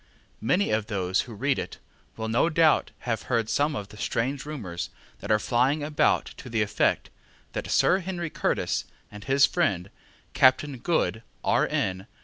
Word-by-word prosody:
Many 180 - +2
of 110 0 0
those 95 -3 0
who 115 -3 -9
read 135 +5 0
it - - -6 0.4
will 110 0 -3
no 115 +9 +2
doubt 160 -1 +3
have 115 -2 -2
heard 115 -3 +1
some 145 +1 +1
of 100 -5 -5
the 105 - -13
strange 130 +7 -2
rumours 100 - -5 0.3
that - - -8
are 110 - +5
flying 130 +7 +1
about 150 0 +2
to 125 - -9
the 115 -2 +1
effect 105 0 0 0.4
that - - -4
Sir 185 - +4
Henry 175 -3 -4
Curtis - - -1 0.3
and 105 0 -10
his 135 +1 +5
friend 100 - 0 0.4
Captain 130 +1 +3
Good, 130 -6 0 0.2
R.N. 95 0 0
120 Hz, 160 wpm, -26 LUFS, 105-145 Hz, 0.4 s, are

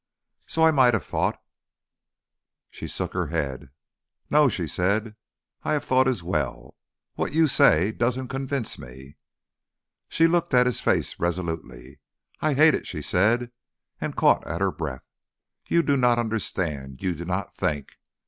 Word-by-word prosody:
"So 160 - 0
I 160 - +6
might 130 -5 +4
have 110 - -3
thought - - -1 0.7
" - - -65
She - - -8
shook - - -4
her 90 -3 -1
head. 70 -5 -3 0.6
"No," 150 -1 +5
she 90 -7 -3
said, 105 +7 -1 0.5
"I - - -1
have 150 - 0
thought 130 0 +3
as 125 -10 -1
well. 65 -8 -3 0.4
What - - -3
you 160 0 +5
say 95 - +4
doesn't 125 +3 -1
convince 135 -2 -3
me." 65 +3 -12 0.9
She 165 - +3
looked 170 -3 +2
at 125 0 +6
his 125 -4 -1
face - - 0
resolutely. 80 -7 -4 0.4
"I 155 -2 +1
hate 155 +2 +6
it," - - -3
she - - -5
said, 120 +6 +1 0.5
and - - -4
caught - - +3
at - - -3
her 95 -1 +1
breath. 70 -8 -6 0.6
"You 170 - +3
do 140 - +2
not 125 -2 +3
understand, 85 - -3
you 90 -2 0
do 85 +1 -7
not 90 +1 -3
think. 75 -2 -3
105 Hz, 160 wpm, -25 LUFS, 80-130 Hz, 0.9 s, I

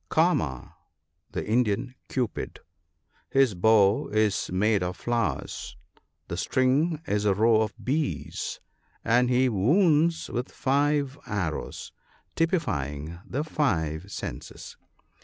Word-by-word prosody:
— - - -45
" - - -44
Kama," 80 - +1 0.5
the - - -3
Indian 115 +1 +1 0.2
Cupid. 125 -6 -3 0.7
His 135 -5 +3
bow 100 +2 +4
is 105 -2 +1
made 105 +2 +2
of 90 0 -3
flowers, 120 -1 -2 0.5
the - - -4
string 145 +5 +1
is 105 -7 0
a 100 -2 +3
row 110 +1 +4
of 110 -2 -2
bees, 145 +3 -2 0.5
and 125 +2 +3
he 125 +1 +3
wounds 155 - +3
with 125 +2 -3
five 140 0 +1
arrows, 90 -7 -3 0.4
typifying 80 - -1
the 140 +4 -2
five 90 - -1
senses. - - -7
115 Hz, 115 wpm, -27 LUFS, 100-140 Hz, 0.7 s, bow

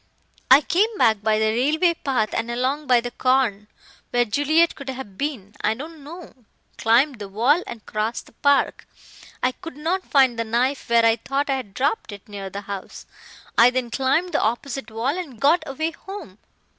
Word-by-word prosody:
"I 265 +3 +8
came 415 +8 +1
back 220 -4 +3
by 215 0 +2
the 220 0 +2
railway 305 +9 +2
path, 260 -9 -1
and 230 +1 -2
along 260 +5 -1
by 245 -1 +5
the 245 +1 -5
corn. 245 -5 +1 0.4
Where 245 0 +2
Juliet 300 +9 +2
could 275 -1 -9
have 255 -7 -7
been, 225 -7 -4
I 215 +1 +2
don't 305 +4 -9
know. 335 +4 -10
I 245 -5 -20
climbed 245 +3 +3
the 200 -1 -7
wall 245 - +2
and 225 -3 -9
crossed 215 +2 -3
the - - -18
park. 285 +4 +1 0.6
I 255 - +3
could 330 +2 -11
not 335 +5 -1
find 260 -4 +3
the - - +1
knife 245 +5 -1
where 235 -1 +4
I 225 0 +4
thought 275 +5 -2
I 270 - +1
had 205 -7 -8
dropped 280 - -1
it, 200 -1 -11
near 200 -2 -7
the 200 +2 -6
house. 200 -1 -8 0.5
I 235 +1 +8
then 250 -2 -2
climbed 280 +8 +1
the 295 - +1
opposite 240 +2 -2
wall 230 +7 -1
and 305 -11 -7
got 310 +5 +4
away 315 +4 -2
home. 325 - -10
255 Hz, 195 wpm, -23 LUFS, 225-290 Hz, 0.6 s, I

